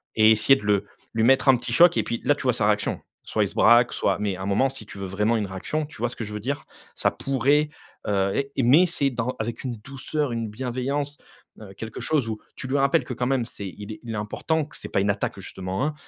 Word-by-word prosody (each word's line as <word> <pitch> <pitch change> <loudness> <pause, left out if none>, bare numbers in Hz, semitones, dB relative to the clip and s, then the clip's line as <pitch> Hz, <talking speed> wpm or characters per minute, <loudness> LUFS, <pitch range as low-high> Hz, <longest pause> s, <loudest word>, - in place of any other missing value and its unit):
et 110 0 +6
essayer 110 +5 +5
de 120 - -7
le 100 -1 +2 0.3
lui 110 0 +1
mettre 135 +3 +4
un 130 - +7
petit - - -5
choc 175 0 +6
et - - +2
puis 115 - -3
là, 145 - +4
tu - - -7
vois 125 -2 +3
sa 105 -3 +1
réaction, 105 -1 0 0.2
soit - - 0
il - - 0
se - - -12
braque, 120 +1 +5
soit - - +1
mais 100 -3 -1
à - - -8
un - - -3
moment 130 +7 +2
si 110 - -6
tu - - -11
veux 95 - -4
vraiment 105 +5 +1
une 105 - -1
réaction, 145 +12 -3
tu 150 - -14
vois 120 +2 0
ce 125 - -9
que 115 - -5
je 105 0 -6
veux 105 - -3
dire? 140 +6 -3 0.3
Ça - - +2
pourrait, 140 +3 +1 0.4
heu, 100 +5 +1
et 130 - +1
mais 150 +10 +6
c'est 140 -5 0
dans 120 +1 -2
avec 115 +3 -4
une 125 -2 -3
douceur, 135 +3 -3
une 115 -2 -3
bienveillance, 130 +5 -3 0.4
heu, 100 -2 -10
quelque 110 +2 -7
chose 145 -7 +1
où 110 - -4 0.2
tu 130 - -7
lui 140 +2 0
rappelles 140 0 +3
que 125 - -5
quand 125 - -1
même 130 -3 +1
c'est 100 -4 -6
il 105 +3 -8
est 105 - -11
il 115 -2 -5
est - - -3
important 150 +9 -1
que - - -12
c'est - - -7
pas - - +1
une 100 - +1
attaque 100 - -3
justement, 95 +8 -4
hein? 155 - -1
120 Hz, 270 wpm, -25 LUFS, 105-135 Hz, 0.4 s, un